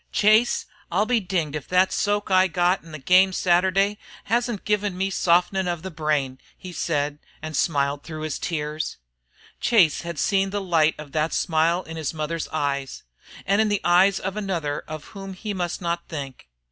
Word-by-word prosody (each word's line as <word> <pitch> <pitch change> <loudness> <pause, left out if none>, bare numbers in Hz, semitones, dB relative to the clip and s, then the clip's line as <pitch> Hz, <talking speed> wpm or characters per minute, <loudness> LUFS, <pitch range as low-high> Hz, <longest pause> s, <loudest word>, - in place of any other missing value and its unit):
"Chase, 215 +2 +3 0.3
I'll 210 - +2
be 245 0 +2
dinged 175 -6 -2
if 150 - -5
thet 185 +1 +3
soak 205 -1 0
I 185 0 +5
got 175 +2 +1
in 165 - -13
the 155 - -6
game 185 +7 +4
Saturday 190 +3 +2 0.2
hasn't 235 -2 -1
give 210 -1 +2
me 195 -1 -2
softenin' 180 +1 +2
of 175 -2 -3
the 190 - -5
brain," 150 -5 -1 0.2
he 185 -2 -9
said, 145 -3 -1 0.2
and 155 0 -6
smiled 140 -2 +1
through 155 0 -8
his 155 -2 -3
tears. 155 -2 -3 0.6
Chase 190 -11 +3
had 170 -2 -6
seen 195 +4 +1
the 205 +1 -2
light 165 -5 +2
of 150 -2 -10
that 155 +2 0
smile 165 +2 +1
in 160 0 -8
his 160 0 -3
mother's 155 +1 -3
eyes; 140 -3 -3 0.4
and 200 +3 +3
in 220 - +2
the 205 -1 +1
eyes 185 +2 +4
of 190 +1 -4
another 170 -8 -2
of 155 -1 -6
whom 195 -1 -7
he 205 +3 -5
must 175 -1 -3
not 170 0 -2
think. 140 - -7
175 Hz, 185 wpm, -24 LUFS, 155-195 Hz, 0.6 s, I